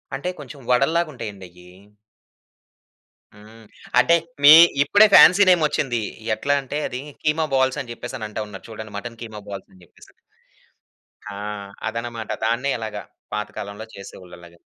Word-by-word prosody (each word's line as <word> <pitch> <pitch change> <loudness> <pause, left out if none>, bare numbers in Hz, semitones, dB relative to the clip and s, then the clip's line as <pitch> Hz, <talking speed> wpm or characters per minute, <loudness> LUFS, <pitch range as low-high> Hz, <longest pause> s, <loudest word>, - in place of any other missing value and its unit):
అంటే 140 +7 -4
కొంచెం 145 0 -11
వడల్లాగుంటాయండయ్యి. 120 - -2 1.6
హ్మ్. 110 +2 -16 0.4
అంటే 170 - +5 0.3
మీ 145 - +10 0.3
ఇప్పుడే 205 +8 +5
ఫ్యాన్సీ 195 +3 +8
నేమొచ్చింది. 150 -8 +1 0.3
ఎట్లా 145 +5 -1
అంటే 135 +2 -5
అది 125 +1 -6 0.2
కీమా 155 +1 +1
బాల్సని 130 -1 0
చెప్పేసనంటా 110 -3 -6
ఉన్నారు 95 -2 -11
చూడండి. 110 -1 -9
మటన్ 115 +2 -8
కీమా 110 -2 -9
బాల్స్ 100 -1 -8
అని 95 - -20
చెప్పేసని. - - -20 1.2
ఆ! - - -8 0.5
అదనమాట. 115 0 -5 0.2
దాన్నే 120 +5 0
ఇలాగా 110 -2 -6 0.3
పాతకాలంలో 105 0 -6
చేసేవాళ్ళు 95 -2 -12
అలాగా. 85 -1 -16
115 Hz, 120 wpm, -22 LUFS, 105-140 Hz, 1.6 s, మీ